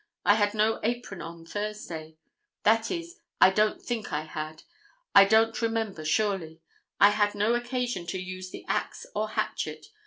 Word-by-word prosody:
I 205 Hz, -, +7 dB
had 205 Hz, 0 st, +1 dB
no 215 Hz, +1 st, +2 dB
apron 235 Hz, -4 st, -3 dB
on 165 Hz, 0 st, -9 dB
Thursday; 170 Hz, -6 st, -5 dB, 0.5 s
that 225 Hz, +1 st, +3 dB
is, 340 Hz, 0 st, -5 dB, 0.2 s
I 190 Hz, -, +8 dB
don't 215 Hz, +2 st, +2 dB
think 235 Hz, -4 st, -4 dB
I 150 Hz, -, 0 dB
had. 155 Hz, 0 st, -6 dB, 0.5 s
I 195 Hz, -, +9 dB
don't 220 Hz, +3 st, +3 dB
remember 225 Hz, -7 st, -1 dB
surely. 165 Hz, -2 st, 0 dB, 0.4 s
I 205 Hz, -, +8 dB
had 205 Hz, 0 st, +1 dB
no 210 Hz, +3 st, +2 dB
occasion 240 Hz, -6 st, -2 dB
to 185 Hz, +2 st, -3 dB
use 185 Hz, 0 st, -6 dB
the -, -, -10 dB
axe -, -, -2 dB
or -, -, -1 dB
hatchet. -, -, -3 dB
205 Hz, 160 wpm, -28 LUFS, 180-225 Hz, 0.5 s, I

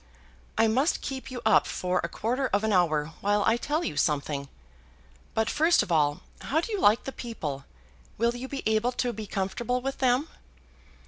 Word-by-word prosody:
"I 225 Hz, -, +5 dB
must 265 Hz, +9 st, +1 dB
keep 265 Hz, -1 st, -5 dB
you 250 Hz, -2 st, -6 dB
up -, -, +5 dB
for 180 Hz, 0 st, -1 dB
a 170 Hz, -, -2 dB
quarter 250 Hz, +8 st, -1 dB
of 205 Hz, -1 st, 0 dB
an 220 Hz, -1 st, +1 dB
hour 160 Hz, -4 st, +2 dB
while 205 Hz, 0 st, +2 dB
I 225 Hz, -, +4 dB
tell 295 Hz, +7 st, -1 dB
you -, -, -3 dB
something. 145 Hz, -3 st, 0 dB, 0.9 s
But 220 Hz, 0 st, +2 dB
first 325 Hz, +3 st, +3 dB
of -, -, -7 dB
all, 150 Hz, +1 st, +2 dB, 0.2 s
how 310 Hz, -, 0 dB
do 385 Hz, +7 st, -4 dB
you 415 Hz, -, -1 dB
like 210 Hz, +3 st, +5 dB
the 270 Hz, -, -5 dB
people? 155 Hz, -, -5 dB, 0.5 s
Will 235 Hz, +2 st, +1 dB
you 250 Hz, +2 st, -5 dB
be 275 Hz, 0 st, -5 dB
able 220 Hz, +3 st, +2 dB
to 245 Hz, 0 st, -1 dB
be 215 Hz, -1 st, -6 dB
comfortable 225 Hz, +7 st, -1 dB
with 270 Hz, +2 st, -4 dB
them?" 260 Hz, +3 st, +2 dB
225 Hz, 190 wpm, -27 LUFS, 180-260 Hz, 0.9 s, I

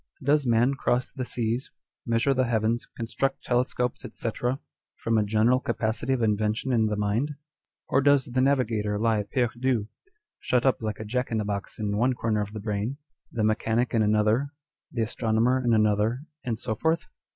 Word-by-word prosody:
Does 145 Hz, 0 st, +3 dB
man 120 Hz, +3 st, +3 dB
cross 125 Hz, -2 st, 0 dB
the 130 Hz, -, -4 dB
seas, 120 Hz, +1 st, -2 dB, 0.4 s
measure 115 Hz, +4 st, +2 dB
the 130 Hz, -1 st, +2 dB
heavens, 115 Hz, +1 st, 0 dB
construct 120 Hz, +4 st, -2 dB
telescopes, 125 Hz, 0 st, 0 dB
&c., 115 Hz, -, -3 dB, 0.7 s
from 115 Hz, 0 st, 0 dB
a -, -, +2 dB
general 110 Hz, +4 st, +3 dB
capacity 115 Hz, 0 st, -1 dB
of 130 Hz, -3 st, +1 dB
invention 110 Hz, +3 st, 0 dB
in 110 Hz, -2 st, +3 dB
the 105 Hz, -, -1 dB
mind, 105 Hz, +8 st, 0 dB, 0.5 s
or 135 Hz, -, +3 dB
does 140 Hz, -1 st, +4 dB
the 130 Hz, +1 st, 0 dB
navigator 115 Hz, -6 st, +1 dB
lie 110 Hz, 0 st, +2 dB
perdu, 120 Hz, 0 st, 0 dB, 0.5 s
shut 125 Hz, 0 st, +1 dB
up 130 Hz, -, +2 dB
like 110 Hz, -2 st, -3 dB
a 110 Hz, -, -5 dB
Jack 125 Hz, +4 st, -1 dB
in 110 Hz, -, +1 dB
a 105 Hz, -, -2 dB
box 100 Hz, -1 st, -4 dB
in 105 Hz, -2 st, -1 dB
one 125 Hz, +4 st, +3 dB
corner 110 Hz, -3 st, 0 dB
of 105 Hz, 0 st, -5 dB
the 110 Hz, -, -5 dB
brain, 105 Hz, +5 st, -2 dB, 0.3 s
the 110 Hz, -, -1 dB
mechanic 110 Hz, +2 st, +1 dB
in 115 Hz, -, +3 dB
another, 110 Hz, +6 st, +2 dB, 0.4 s
the 115 Hz, -3 st, 0 dB
astronomer 115 Hz, +3 st, +1 dB
in 120 Hz, -, +2 dB
another, 110 Hz, +4 st, +2 dB, 0.2 s
and 115 Hz, -3 st, -2 dB
so 110 Hz, 0 st, -3 dB
forth 160 Hz, +9 st, 0 dB
115 Hz, 175 wpm, -26 LUFS, 110-125 Hz, 0.7 s, does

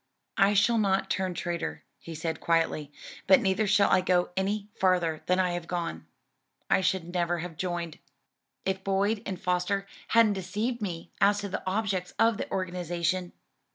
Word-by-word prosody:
"I 200 Hz, +1 st, +5 dB
shall 230 Hz, +3 st, +4 dB
not 195 Hz, -2 st, +1 dB
turn 185 Hz, -2 st, -1 dB
traitor," 170 Hz, 0 st, -3 dB, 0.2 s
he 165 Hz, -, -8 dB
said 160 Hz, 0 st, -3 dB
quietly, 165 Hz, -3 st, 0 dB, 0.4 s
"but 280 Hz, -, +7 dB
neither 195 Hz, -1 st, +1 dB
shall 200 Hz, 0 st, +4 dB
I -, -, +5 dB
go 180 Hz, -1 st, +1 dB
any 200 Hz, +2 st, -1 dB
farther 175 Hz, -4 st, +1 dB
than 180 Hz, +1 st, +3 dB
I 180 Hz, -1 st, +2 dB
have 175 Hz, -1 st, -4 dB
gone. 85 Hz, -, -4 dB, 0.6 s
I -, -, +5 dB
should 180 Hz, -2 st, -1 dB
never 175 Hz, -1 st, 0 dB
have 170 Hz, -1 st, -6 dB
joined, 175 Hz, -2 st, -4 dB, 0.7 s
if 190 Hz, 0 st, -1 dB
Boyd 200 Hz, +2 st, +1 dB
and 190 Hz, -2 st, -4 dB
Foster 180 Hz, +2 st, 0 dB, 0.2 s
hadn't 230 Hz, -2 st, +5 dB
deceived 210 Hz, +6 st, -3 dB
me 175 Hz, -5 st, -5 dB
as 200 Hz, +1 st, +5 dB
to 200 Hz, -, -4 dB
the -, -, -3 dB
objects 190 Hz, -2 st, -1 dB
of 225 Hz, -1 st, +3 dB
the -, -, -5 dB
organization." 180 Hz, -1 st, -2 dB
185 Hz, 165 wpm, -28 LUFS, 175-200 Hz, 0.7 s, but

